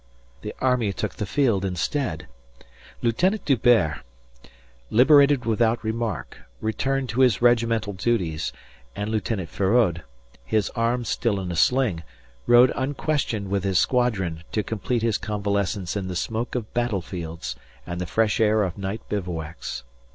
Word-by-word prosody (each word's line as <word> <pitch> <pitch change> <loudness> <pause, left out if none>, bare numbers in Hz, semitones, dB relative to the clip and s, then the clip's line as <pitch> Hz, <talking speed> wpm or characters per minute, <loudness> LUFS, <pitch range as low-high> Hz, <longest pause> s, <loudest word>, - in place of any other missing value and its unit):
The 105 - -6
army 125 -6 +1
took 105 0 -3
the 105 - -3
field 115 -6 +1
instead. 95 - -2 0.8
Lieutenant 180 - +1
D'Hubert, 115 - +3 0.9
liberated 140 +2 +5
without 115 +1 +1
remark, 110 -1 -3 0.2
returned 135 +5 -1
to 120 +4 0
his 125 -7 +4
regimental 115 -3 +2
duties, 90 -7 -1 0.4
and 105 +1 -3
Lieutenant 105 -4 -2
Feraud, 95 -4 +2 0.4
his 110 -3 0
arm 115 +1 0
still 110 -3 0
in 90 -2 -4
a - - -3
sling, 120 -2 +2 0.5
rode 120 +1 +7
unquestioned 130 -6 -1
with 100 -2 0
his 95 -2 +1
squadron 95 -11 +1
to 105 - +1
complete 115 +2 -2
his 115 -3 +1
convalescence 100 -3 -2
in 95 -2 -2
the 90 - -4
smoke 115 +7 -3
of 115 -4 -4
battlefields 90 - -3 0.3
and 90 0 -5
the 90 - -3
fresh 110 +3 +1
air 110 -1 +4
of 95 0 -4
night 100 +3 -4
bivouacs. 85 -9 -4
110 Hz, 135 wpm, -24 LUFS, 95-120 Hz, 0.9 s, rode